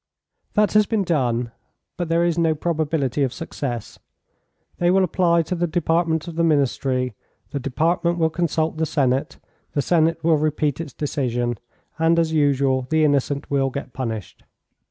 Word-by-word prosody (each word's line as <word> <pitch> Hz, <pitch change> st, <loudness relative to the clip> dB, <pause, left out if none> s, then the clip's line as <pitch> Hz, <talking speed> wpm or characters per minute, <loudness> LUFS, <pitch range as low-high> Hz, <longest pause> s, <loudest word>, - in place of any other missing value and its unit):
"That 210 Hz, 0 st, +3 dB
has 210 Hz, -1 st, +4 dB
been 220 Hz, -3 st, +1 dB
done, 125 Hz, -8 st, 0 dB, 0.4 s
but 175 Hz, -2 st, -3 dB
there 165 Hz, +1 st, +3 dB
is 170 Hz, -2 st, +1 dB
no 165 Hz, -2 st, +2 dB
probability 155 Hz, -4 st, -1 dB
of 135 Hz, -3 st, +1 dB
success. 130 Hz, -5 st, -5 dB, 0.8 s
They 175 Hz, -, +3 dB
will 190 Hz, +1 st, +4 dB
apply 170 Hz, -1 st, +2 dB
to 165 Hz, -, -4 dB
the 175 Hz, 0 st, 0 dB
Department 165 Hz, 0 st, 0 dB
of 165 Hz, -1 st, -7 dB
the 170 Hz, -, +2 dB
Ministry, 135 Hz, -4 st, +1 dB, 0.4 s
the 140 Hz, -, -2 dB
Department 165 Hz, +6 st, 0 dB
will 160 Hz, -1 st, +2 dB
consult 160 Hz, -1 st, -1 dB
the 160 Hz, 0 st, 0 dB
Senate, 135 Hz, -3 st, 0 dB, 0.4 s
the 145 Hz, -, +1 dB
Senate 165 Hz, +2 st, +2 dB
will 160 Hz, -1 st, +4 dB
repeat 150 Hz, -1 st, 0 dB
its 150 Hz, -6 st, -8 dB
decision, 125 Hz, -6 st, -2 dB, 0.4 s
and, 165 Hz, +1 st, +3 dB
as 165 Hz, -1 st, +1 dB
usual, 135 Hz, -3 st, +2 dB
the 160 Hz, 0 st, +3 dB
innocent 140 Hz, 0 st, 0 dB
will 135 Hz, -1 st, +2 dB
get 135 Hz, -1 st, -6 dB
punished." 115 Hz, -7 st, -5 dB
155 Hz, 160 wpm, -22 LUFS, 135-170 Hz, 0.8 s, has